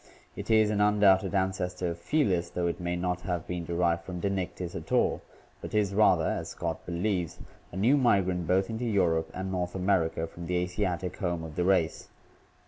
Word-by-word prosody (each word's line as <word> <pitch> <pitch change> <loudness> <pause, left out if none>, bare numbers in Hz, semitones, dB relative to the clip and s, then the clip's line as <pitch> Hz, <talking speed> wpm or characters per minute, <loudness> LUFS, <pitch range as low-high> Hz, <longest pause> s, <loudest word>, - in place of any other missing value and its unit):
It - - -7
is 110 -1 +4
an 105 -1 +1
undoubted 105 -2 +4
ancestor 90 -2 -1
of 85 - -7
Fells, 90 - +1
though 90 0 -2
it 85 - -1
may 90 0 -2
not 90 0 -2
have 90 -3 -3
been 90 -1 -4
derived 85 0 0
from 90 0 -6
Dinictis 95 -2 -3
at - - -7
all, - - +2 0.4
but - - -6
is 100 -2 +2
rather, 105 +2 +4
as - - -2
Scott - - -4
believes, 90 0 -1 0.3
a 90 - -7
new 120 +9 +4
migrant 95 - +2
both 95 +4 +2
into 115 +2 -4
Europe 85 -7 +1
and 95 +1 -4
North 90 -1 -2
America 90 -4 +1
from 85 +1 -9
the 90 - -1
Asiatic 90 0 -2
home 85 -4 -2
of 80 -2 -8
the 90 - 0
race. 90 -4 +1
90 Hz, 190 wpm, -28 LUFS, 85-100 Hz, 0.4 s, is